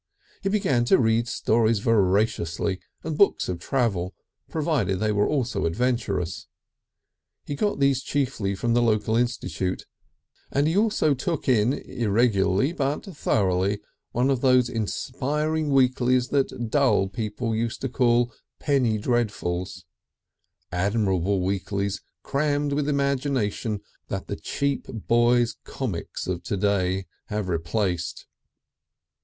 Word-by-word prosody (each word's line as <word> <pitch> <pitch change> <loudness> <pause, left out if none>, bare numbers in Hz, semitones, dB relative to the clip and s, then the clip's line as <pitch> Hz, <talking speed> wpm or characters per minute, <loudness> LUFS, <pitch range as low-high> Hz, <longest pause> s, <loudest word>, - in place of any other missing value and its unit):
He 195 - 0
began 190 - +2
to - - +5
read 115 0 +2
stories 115 -1 +2
voraciously, 100 -3 +1 0.2
and 160 -1 -3
books 200 +6 +3
of 90 -2 -3
travel, 100 -5 -1 0.3
provided 145 - 0
they 110 +1 +1
were 105 0 +2
also 120 - 0
adventurous. 95 -6 -1 1.0
He - - -4
got 205 +3 -1
these 140 -1 +3
chiefly 130 -9 -1
from 115 +5 0
the 120 - +3
local 110 -1 +2
institute, 105 -7 -1 0.7
and 140 +2 +2
he 160 - +1
also 205 -8 +3
"took 150 +4 -3
in," 120 -1 +3
irregularly 110 - +1
but 140 -2 -1
thoroughly, 100 -4 +1 0.3
one 125 +3 +2
of 130 -3 0
those 125 -2 +4
inspiring 145 +7 -1
weeklies 130 -1 +3
that 125 -5 -1
dull 135 -9 +3
people 110 +2 -3
used 115 +1 -2
to 135 - -1
call 120 -1 +2 0.3
"penny 130 -7 +2
dreadfuls," 100 -6 -2 0.9
admirable 95 0 +1
weeklies 100 +1 -2 0.2
crammed 145 0 0
with 145 0 0
imagination 135 -7 0 0.3
that - - -4
the - - -4
cheap 140 -1 -2
boys' 120 +1 +2
"comics" - - -4
of 90 -1 -2
to 100 - -3
day 95 -1 +1 0.2
have 105 -2 -2
replaced. 85 +1 -2
115 Hz, 120 wpm, -25 LUFS, 100-135 Hz, 1.0 s, to